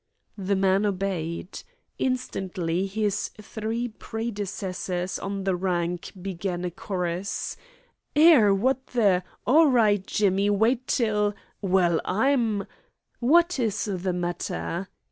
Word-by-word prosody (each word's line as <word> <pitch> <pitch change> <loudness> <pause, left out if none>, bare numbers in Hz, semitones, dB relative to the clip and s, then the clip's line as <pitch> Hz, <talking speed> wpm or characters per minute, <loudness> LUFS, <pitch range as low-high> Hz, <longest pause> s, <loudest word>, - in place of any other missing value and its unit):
The 195 +1 0
man 195 +1 +3
obeyed. 185 -3 -3 0.4
Instantly 190 -8 -1
his 205 0 -1
three 220 +3 -3
predecessors 200 -5 -4
on 195 0 -4
the 190 -1 +1
rank 175 -1 -2
began 180 -1 -3
a 175 - -2
chorus: 180 +1 -3 0.6
"'Ere! 295 -9 +7
Wot 245 +7 +2
th' 200 -7 +3
" - - -33
"All 310 +5 +6
right, 215 -7 +3
Jimmy. 200 0 +2
Wait 230 +5 +2
till 210 -3 +1
" - - -39
"Well, 180 -4 +2
I'm 225 -1 +1 0.3
" - - -55
"What 340 +6 +4
is 215 -3 0
the 185 -3 -2
matter?" 175 +1 -3
195 Hz, 120 wpm, -26 LUFS, 185-225 Hz, 0.6 s, Ere